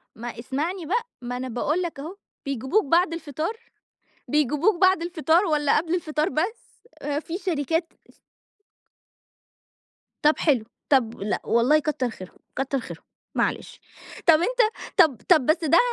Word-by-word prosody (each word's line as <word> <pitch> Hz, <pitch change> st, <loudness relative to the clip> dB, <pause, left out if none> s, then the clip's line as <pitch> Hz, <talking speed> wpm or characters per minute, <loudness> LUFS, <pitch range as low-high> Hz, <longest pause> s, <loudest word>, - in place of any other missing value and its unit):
ما 235 Hz, 0 st, -7 dB
اسمعني 315 Hz, +8 st, -3 dB
بقى، 465 Hz, +8 st, -1 dB
ما 245 Hz, 0 st, -4 dB
أنا 260 Hz, -, -4 dB
باقُول 295 Hz, +9 st, -1 dB
لك 335 Hz, -5 st, -4 dB
أهو، 330 Hz, +7 st, -7 dB, 0.3 s
بيجيبوك 275 Hz, -, 0 dB
بعد 335 Hz, +3 st, +3 dB
الفطار؟ 315 Hz, -, -3 dB, 0.7 s
بيجيبوك 300 Hz, -, +2 dB
بعد 375 Hz, -2 st, +5 dB
الفطار 340 Hz, +1 st, +2 dB
والّا 295 Hz, -3 st, +2 dB
قبل 330 Hz, +3 st, 0 dB
الفطار 310 Hz, 0 st, -1 dB
بس؟ 375 Hz, +9 st, -4 dB, 0.4 s
في 340 Hz, +2 st, -5 dB
شركات 330 Hz, -2 st, -1 dB, 0.2 s
س -, -, -31 dB, 2.1 s
طَب 300 Hz, +1 st, +5 dB
حلو. 265 Hz, -9 st, +2 dB, 0.3 s
طَ 280 Hz, -, +6 dB, 0.2 s
لأ 205 Hz, +1 st, -2 dB
والله 250 Hz, +7 st, +4 dB
كتّر 285 Hz, -5 st, -1 dB
خيرهم، 185 Hz, -4 st, -11 dB, 0.2 s
كتّر 270 Hz, 0 st, -1 dB
خيرهم، -, -, -9 dB, 0.3 s
معلش. -, -, -2 dB, 0.5 s
طَب 325 Hz, -2 st, +7 dB
أنت -, -, -1 dB, 0.4 s
طَب 310 Hz, -, +5 dB
طَب 310 Hz, -8 st, +6 dB
بس 320 Hz, +2 st, +2 dB
ده 320 Hz, +2 st, +5 dB
310 Hz, 140 wpm, -24 LUFS, 275-350 Hz, 2.1 s, طَب